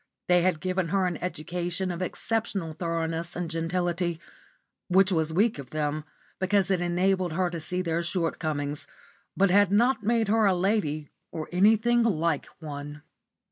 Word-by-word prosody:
They 180 0 +5
had 175 -3 +1
given 185 -1 -1
her 190 +2 +1
an 175 -3 -1
education 175 +2 -3
of 175 +1 -5
exceptional 195 -3 -2
thoroughness 165 0 -3
and 175 -2 -3
gentility; 170 0 -1 0.7
which 190 +1 +4
was 160 -2 +1
weak 205 +1 +2
of 135 - -8
them, 150 0 -2 0.3
because 190 0 +2
it 185 -2 +2
enabled 180 0 +1
her 180 +1 0
to 170 - -4
see 180 +4 -2
their 165 -1 0
shortcomings, 155 -4 -2 0.5
but 195 -1 +4
had 200 0 +5
not 240 +4 +3
made 225 +1 +1
her 220 0 +3
a 190 - +3
lady 175 -6 0 0.2
or 155 -1 -5
anything 220 +6 +4
like 170 -9 +1
one. 145 -1 -7
175 Hz, 155 wpm, -27 LUFS, 165-195 Hz, 0.7 s, They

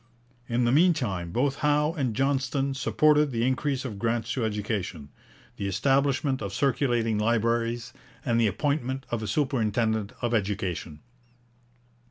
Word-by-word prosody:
In 120 +1 +1
the 120 - +3
mean 170 +5 +5
time 95 - -3
both 135 +6 0
Howe 150 +1 +2
and 130 -8 -1
Johnston 135 +1 0
supported 150 +2 +3
the 115 -2 0
increase 135 +1 0
of 105 -6 -5
grants 115 +1 -1
to 125 - -1
education, 105 -8 -3 0.5
the 100 - -2
establishment 135 - +1
of 100 -3 -4
circulating 120 -6 +1
libraries, 115 +1 0 0.3
and 115 0 +2
the 115 - +4
appointment 135 +2 -1
of 120 -2 -1
a 110 - -4
superintendent 110 -4 0
of 120 -1 -1
education. 95 -7 -2
120 Hz, 140 wpm, -27 LUFS, 110-140 Hz, 0.5 s, mean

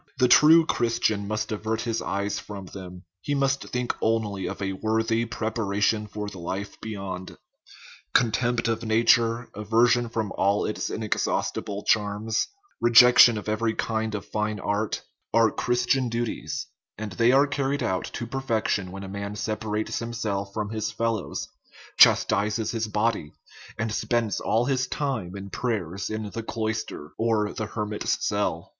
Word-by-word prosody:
The 125 - +4
true 160 +6 +7
Christian 115 -6 0
must 105 +1 -2
avert 110 +1 -2
his 115 -2 -2
eyes 100 0 -2
from 100 0 -8
them; 90 -1 -10 0.2
he 145 - -1
must 135 0 0
think 125 0 -1
only 105 -4 0
of - - -5
a 95 -1 -2
worthy 110 +3 0
preparation 110 -1 -1
for 105 0 -5
the 95 -2 -8
life 95 +4 -5
beyond. 95 -4 -6 0.7
Contempt 120 0 +2
of 115 0 0
nature, 115 +1 +3
aversion 115 +3 +2
from 110 -3 -2
all 100 +1 +2
its 105 - -2
inexhaustible 105 -1 -2
charms, 105 +1 +1 0.3
rejection 120 -1 +8
of 105 - -6
every 110 +1 0
kind 110 -1 -1
of 100 -1 -5
fine 105 0 -2
art, 105 +3 -1 0.3
are 115 -1 +5
Christian 125 +1 +1
duties; 115 0 -3 0.3
and 105 -1 -5
they 115 +7 +3
are 135 +2 +5
carried 140 0 -1
out 95 -5 -1
to 120 - -4
perfection 115 -6 -1
when 100 +1 -7
a - - -6
man 100 +1 -5
sepa 110 0 -3
rates 105 +1 -1
himself 110 -4 -3
from 105 0 -3
his 110 -1 -2
fellows, 115 -2 -2 0.5
chastises 105 +2 +4
his 115 -2 -2
body, 105 -7 -1 0.4
and 115 0 -2
spends 115 -2 0
all 115 +3 +1
his 130 -1 0
time 130 -13 -3
in 100 0 -8
prayer 110 -10 -2
in 110 -1 -4
the 115 - -4
cloister 110 -8 -4
or 110 -2 +1
the 110 - -4
her 105 0 -3
mit's 105 0 -1
cell. 95 -4 -1
110 Hz, 155 wpm, -26 LUFS, 100-115 Hz, 0.7 s, rejection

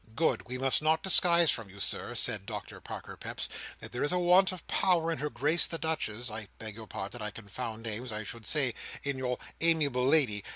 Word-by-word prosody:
"Good! 160 -2 0
We 125 +1 -5
must 135 +2 +5
not 155 +1 +1
disguise 175 -3 +7
from 115 -4 -4
you, 100 +1 -14
Sir," - - -1
said - - +1
Doctor - - -7
Parker - - -8
Peps, - - -6 0.3
"that - - -11
there 125 - -3
is 145 - +1
a 180 - +1
want 180 +2 +4
of 185 - -9
power 170 -3 +1
in 165 - -3
Her 150 - -2
Grace 145 +7 +3
the 165 - -4
Duchess—I 115 -9 -4
beg 110 -1 -8
your 110 +1 -11
pardon; 100 +5 -6
I 105 - -3
confound 110 +1 -7
names; 115 +2 -4
I 110 0 -4
should 115 +1 -6
say, 135 -6 +2 0.3
in 140 -2 -2
your 125 -1 -2 0.2
amiable 145 -6 +2
lady. 130 -9 +2
130 Hz, 210 wpm, -30 LUFS, 110-160 Hz, 0.3 s, disguise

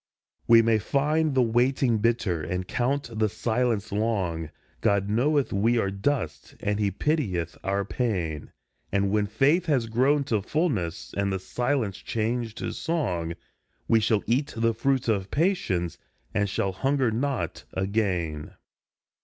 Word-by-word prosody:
We 115 0 +7
may 115 -1 +3
find 150 +5 +1
the 130 - +5
waiting 120 0 +2
bitter, 105 -7 +1
and 90 +3 -3
count 130 +1 -1
the 110 -1 +3
silence 115 -1 -1
long, 95 -7 -1 0.3
God 100 -1 +2
knoweth 140 +5 +2
we 115 +5 +2
are 100 -4 +1
dust, 100 - -2
and 105 0 -1
he 105 -1 +2
pitieth 95 - -1
our 100 +1 0
pain; 90 - -2 0.4
And 100 0 +1
when 105 0 +2
faith 145 - +2
has 135 -7 +2
grown 130 +6 +2
to 110 -6 0
fulness, 105 - -1
and 100 0 0
the 95 - 0
silence 120 0 -1
changed 115 0 -2
to - - -3
song, 90 - -2 0.5
We 115 - +5
shall 110 -1 +1
eat 130 +6 +1
the 115 0 +2
fruit 130 +3 0
of 100 -4 0
patience, 140 - 0 0.3
and 100 -1 +1
shall 95 0 0
hunger 135 +5 +1
not 130 +4 -2
again. 95 -6 -1
110 Hz, 145 wpm, -26 LUFS, 95-130 Hz, 0.5 s, We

